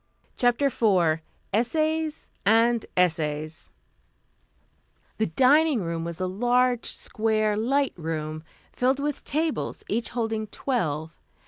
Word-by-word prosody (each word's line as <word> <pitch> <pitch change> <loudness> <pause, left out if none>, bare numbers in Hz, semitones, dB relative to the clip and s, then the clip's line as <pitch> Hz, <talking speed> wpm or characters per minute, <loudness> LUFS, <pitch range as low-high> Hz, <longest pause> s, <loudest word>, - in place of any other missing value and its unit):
CHAPTER 245 +3 +2
IV 185 - +2 0.3
ESSAYS 310 +7 0
AND 230 +2 +3
ESSAYS 155 -3 0 1.5
The 220 - +2
dining 270 - +4
room 165 -1 -3
was 170 0 -6
a 185 - 0
large, 245 +5 +1
square, 215 -1 0
light 270 +6 +1
room, 155 -2 -4 0.3
filled 260 +2 +1
with 290 0 -2
tables, 315 +1 -2
each 230 +2 -1
holding 225 -2 -2
twelve. 160 - -2
225 Hz, 105 wpm, -26 LUFS, 170-255 Hz, 1.5 s, dining